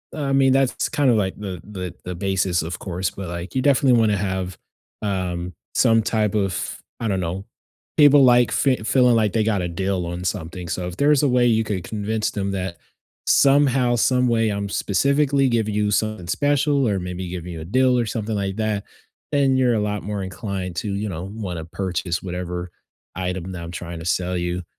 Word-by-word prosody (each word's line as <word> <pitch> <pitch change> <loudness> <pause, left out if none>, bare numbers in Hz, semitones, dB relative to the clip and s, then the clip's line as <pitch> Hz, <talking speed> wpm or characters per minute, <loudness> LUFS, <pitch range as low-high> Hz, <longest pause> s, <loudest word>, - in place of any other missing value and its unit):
I 145 -3 -2
mean, 135 -1 +4
that's 135 -1 +1
kind 145 -3 +2
of 120 - +4
like 95 -3 -1
the 95 -5 -6
the 95 -4 -6
the 90 0 -4
basis, 95 -1 0
of 85 +1 -5
course, 90 -1 -2
but 95 -2 -7
like, 85 +1 -6
you 130 - +2
definitely 135 -2 +4
want 110 -2 +3
to 105 - +1
have, 95 -2 -3 0.4
um, 90 -3 -2 0.2
some 115 0 +4
type 105 -2 0
of, 95 -3 -1 0.2
I 115 - -1
don't 95 -2 0
know, 90 +3 -4 0.5
people 145 -2 +7
like, 125 -1 +5
fee 135 -2 +2
feeling, 125 +1 +4
like, 110 -3 +2
they 110 - +2
got 105 -3 +1
a 90 - -1
deal 95 +1 -1
on 85 +1 -5
something, 90 -2 -4
so 90 +2 -2
if 90 - -6
there's 145 0 +4
a 145 - +4
way 125 -1 +3
you 115 -2 +3
could 100 -4 -3
convince 110 +2 -2
them 100 -1 -2
that, 95 -2 -3 0.5
"Somehow, 135 -3 +4
someway 120 -2 +2
I'm 100 -1 -2
specifically 140 +7 +2
giving 110 -3 0
you 105 0 +1
something 110 -4 -1
special, 145 - +2
or 100 -3 0
maybe 90 0 -5
giving 90 0 -6
you 80 - -6
a - - -7
deal, 125 +6 +3
or 120 - +1
something 110 -1 -3
like 100 -1 -2
that, 110 -2 -1 0.5
then 135 -2 +3
you're 125 -2 +3
a - - +1
lot 105 -1 -2
more 105 -1 -3
inclined 95 -1 -5
to, 105 -3 -2
you 105 +2 -2
know, 85 -1 -5
wanna 90 -7 -5
purchase 90 -1 -3
whatever 90 -1 -4 0.4
item 90 0 -3
that 90 -2 -6
I'm 85 - -7
trying 85 -1 -6
to 80 - -8
sell 90 +1 0
you." 90 +1 -2
100 Hz, 205 wpm, -22 LUFS, 90-120 Hz, 0.5 s, people